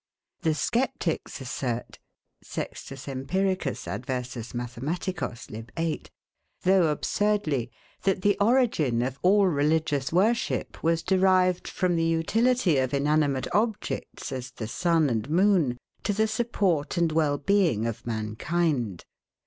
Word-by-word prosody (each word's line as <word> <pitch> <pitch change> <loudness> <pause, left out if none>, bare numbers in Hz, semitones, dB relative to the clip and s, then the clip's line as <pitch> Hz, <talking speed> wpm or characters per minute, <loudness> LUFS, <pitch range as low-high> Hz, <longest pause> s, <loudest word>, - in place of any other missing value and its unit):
The 160 -3 +1
sceptics 230 - -1
assert 125 -2 -4 0.4
[Sext. 135 +1 -6
Emp. 135 0 -5
adrersus 130 - -2
Math. 130 +4 -4
lib. 110 +2 -8
viii.], 165 -2 -1 0.6
though 185 -2 +5
absurdly, 155 - 0 0.3
that 190 -1 0
the 205 0 +4
origin 200 - +3
of 130 +2 -3
all 200 +2 +5
religious 150 -3 +1
worship 215 +7 +1
was 165 0 +1
derived 185 -1 +3
from 180 -2 0
the 165 - +1
utility 175 - +2
of 130 +1 0
inanimate 145 -1 +2
objects, 220 0 -2
as 125 -1 -4
the 115 -3 -6
sun 165 +4 +2
and 115 0 -1
moon, 170 -7 +3 0.2
to 205 - 0
the 215 +2 +2
support 200 -9 0
and 170 -2 +2
well 155 -2 +2
being 160 - +2
of 115 0 -4
mankind. 115 - -1
160 Hz, 120 wpm, -27 LUFS, 130-190 Hz, 0.6 s, though